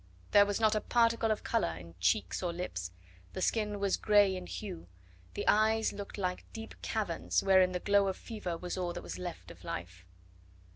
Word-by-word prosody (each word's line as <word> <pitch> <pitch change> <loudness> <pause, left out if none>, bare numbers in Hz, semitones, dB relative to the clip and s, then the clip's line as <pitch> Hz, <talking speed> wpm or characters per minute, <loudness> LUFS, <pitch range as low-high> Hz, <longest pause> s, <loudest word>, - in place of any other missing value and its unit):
There 205 -1 +7
was 205 +1 -1
not 220 -1 +4
a 215 - +1
particle 230 -1 +2
of 215 - 0
colour 80 -1 0
in 85 -1 -11
cheeks 90 +3 +1
or 175 -2 -1
lips, 170 - -4 0.4
the - - -4
skin 210 -2 0
was 200 -1 +1
grey 205 -3 +4
in 180 -1 -6
hue, 185 - -6 0.5
the - - -3
eyes 220 +1 +3
looked 200 0 -7
like 180 -2 -3
deep 225 -1 -7
caverns, 210 -7 -1
wherein 190 -1 +5
the 180 - -2
glow 200 +1 +3
of 190 - -2
fever 195 -7 -5
was 180 +2 -4
all 175 -1 -2
that - - -6
was 85 +1 -6
left - - -7
of - - -15
life. 90 +1 -6
195 Hz, 195 wpm, -32 LUFS, 170-215 Hz, 0.5 s, There